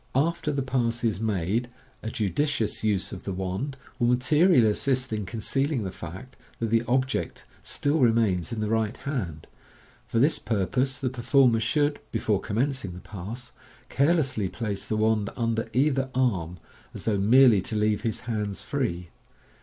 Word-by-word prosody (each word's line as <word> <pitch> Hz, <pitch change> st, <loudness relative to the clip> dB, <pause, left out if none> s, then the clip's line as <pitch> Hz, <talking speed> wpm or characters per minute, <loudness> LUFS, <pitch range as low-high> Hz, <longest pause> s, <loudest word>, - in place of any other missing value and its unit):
After 150 Hz, +2 st, +1 dB
the 140 Hz, -2 st, -1 dB
pass 120 Hz, -2 st, -1 dB
is 110 Hz, -4 st, +1 dB
made, 110 Hz, +2 st, -1 dB, 0.3 s
a 110 Hz, -, -4 dB
judicious 115 Hz, +2 st, -1 dB
use 105 Hz, -4 st, 0 dB
of -, -, -8 dB
the 100 Hz, -, -4 dB
wand 95 Hz, +10 st, -3 dB, 0.2 s
will 120 Hz, -, +3 dB
mate 125 Hz, +1 st, +4 dB
rially 155 Hz, -5 st, +6 dB
assist 130 Hz, +3 st, +1 dB
in 105 Hz, -3 st, -3 dB
concealing 130 Hz, -, -1 dB
the 95 Hz, -, -4 dB
fact 95 Hz, +10 st, -9 dB, 0.2 s
that 115 Hz, -2 st, -2 dB
the 115 Hz, 0 st, +4 dB
object 130 Hz, +2 st, -1 dB, 0.2 s
still 145 Hz, +3 st, 0 dB
re 120 Hz, -4 st, +5 dB
mains 105 Hz, -5 st, +1 dB
in 115 Hz, -2 st, -3 dB
the 105 Hz, -, -1 dB
right 110 Hz, -1 st, 0 dB
hand. 95 Hz, -, -4 dB, 0.6 s
For 120 Hz, -1 st, -2 dB
this 140 Hz, +7 st, +4 dB
purpose 120 Hz, +6 st, 0 dB
the 130 Hz, -2 st, -1 dB
performer 125 Hz, -1 st, +3 dB
should, 145 Hz, +6 st, +1 dB
before 110 Hz, -3 st, 0 dB
commencing 120 Hz, -2 st, -1 dB
the 90 Hz, -, -9 dB
pass, 110 Hz, +5 st, -7 dB, 0.4 s
carelessly 140 Hz, -, +1 dB
place 105 Hz, -2 st, -4 dB
the 110 Hz, -, -1 dB
wand 110 Hz, -1 st, +2 dB
under 115 Hz, -2 st, -1 dB
either 135 Hz, 0 st, +1 dB
arm, 95 Hz, -10 st, 0 dB, 0.4 s
as -, -, -6 dB
though 105 Hz, -3 st, +1 dB
merely 115 Hz, 0 st, +6 dB
to 110 Hz, -, -4 dB
leave 105 Hz, 0 st, +1 dB
his 115 Hz, -2 st, -2 dB
hands 105 Hz, -4 st, -3 dB
free. 90 Hz, -11 st, -2 dB
115 Hz, 165 wpm, -26 LUFS, 105-130 Hz, 0.6 s, rially